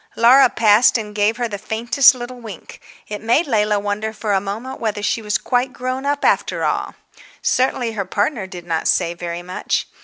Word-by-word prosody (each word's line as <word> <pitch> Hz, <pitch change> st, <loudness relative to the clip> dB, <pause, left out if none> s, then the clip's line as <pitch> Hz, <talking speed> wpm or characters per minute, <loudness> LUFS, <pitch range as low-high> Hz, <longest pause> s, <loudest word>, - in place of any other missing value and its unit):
Laura 250 Hz, +3 st, +6 dB
passed 220 Hz, +2 st, +4 dB
and 210 Hz, -2 st, -6 dB
gave 210 Hz, +2 st, +1 dB
her 240 Hz, -1 st, -1 dB
the 205 Hz, -3 st, -6 dB
faintest 235 Hz, +6 st, +3 dB
little 245 Hz, 0 st, -8 dB
wink; 215 Hz, -7 st, -11 dB, 0.3 s
it 210 Hz, 0 st, -6 dB
made 235 Hz, +9 st, +2 dB
Leila 210 Hz, -5 st, +1 dB
wonder 205 Hz, +2 st, -3 dB
for 210 Hz, -1 st, -2 dB
a 195 Hz, -, +2 dB
moment 220 Hz, +7 st, -6 dB
whether 210 Hz, -2 st, -3 dB
she 225 Hz, -, 0 dB
was 210 Hz, -2 st, 0 dB
quite 250 Hz, +1 st, -1 dB
grown 255 Hz, +2 st, -4 dB
up 285 Hz, 0 st, -1 dB
after -, -, +1 dB
all. -, -, -2 dB, 0.5 s
Certainly 255 Hz, -2 st, +1 dB
her 210 Hz, -3 st, -3 dB
partner 210 Hz, 0 st, -1 dB
did 180 Hz, -2 st, -10 dB
not 165 Hz, -2 st, -1 dB
say 170 Hz, -, +1 dB
very 175 Hz, 0 st, -6 dB
much. 180 Hz, +1 st, -2 dB
220 Hz, 190 wpm, -19 LUFS, 205-245 Hz, 0.5 s, Laura